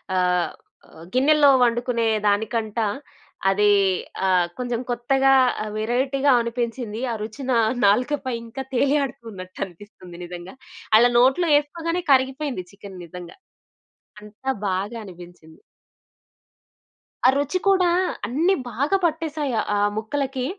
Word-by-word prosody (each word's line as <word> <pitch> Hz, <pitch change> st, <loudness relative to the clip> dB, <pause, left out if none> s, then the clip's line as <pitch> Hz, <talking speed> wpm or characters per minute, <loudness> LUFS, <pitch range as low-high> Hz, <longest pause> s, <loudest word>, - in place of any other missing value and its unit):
ఆహ్, 180 Hz, -2 st, +1 dB, 0.4 s
ఆహ్, 160 Hz, -, -14 dB
గిన్నెలో 285 Hz, +3 st, +5 dB
వండుకునే 240 Hz, -1 st, +1 dB, 0.2 s
దానికంటా 220 Hz, +1 st, 0 dB, 0.6 s
అది 205 Hz, +2 st, +3 dB, 0.6 s
ఆహ్, 180 Hz, -2 st, +3 dB
కొంచెం 245 Hz, -1 st, -3 dB
కొత్తగా 270 Hz, +3 st, +2 dB, 0.3 s
ఆ -, -, -5 dB
వేరైటీగా 265 Hz, +5 st, +1 dB
అనిపించింది. 235 Hz, -1 st, -4 dB
ఆ -, -, -2 dB
రుచిన 255 Hz, +5 st, -7 dB
నా -, -, +4 dB, 0.3 s
నాలుకపై 255 Hz, +4 st, +1 dB
ఇంకా 245 Hz, +4 st, -7 dB
తేలి 280 Hz, +3 st, +2 dB
ఆడుతున్నట్టు 225 Hz, -8 st, -8 dB
అనిపిస్తుంది 180 Hz, -1 st, -14 dB
నిజంగా! 175 Hz, +3 st, -9 dB, 0.4 s
అలా 240 Hz, +2 st, +5 dB
నోట్లో 270 Hz, +7 st, +3 dB
ఎసుకోగానే 335 Hz, +4 st, -4 dB
కరిగిపోయింది 265 Hz, -5 st, +1 dB
చికెను 200 Hz, -2 st, -12 dB
నిజంగా! 175 Hz, +1 st, -11 dB, 0.8 s
అంతా 210 Hz, +5 st, -8 dB, 0.2 s
బాగా 195 Hz, +5 st, -3 dB
అనిపించింది! 175 Hz, -3 st, -14 dB, 1.7 s
ఆ -, -, +8 dB
రుచి 285 Hz, +6 st, 0 dB
కూడా 375 Hz, -2 st, +4 dB, 0.4 s
అన్ని 320 Hz, +10 st, +2 dB, 0.2 s
బాగా 280 Hz, -, +1 dB
పట్టేసాయి 310 Hz, -4 st, -2 dB, 0.2 s
ఆ -, -, +1 dB, 0.2 s
ముక్కలకి. 265 Hz, +3 st, -2 dB
240 Hz, 110 wpm, -23 LUFS, 205-275 Hz, 1.7 s, ఆ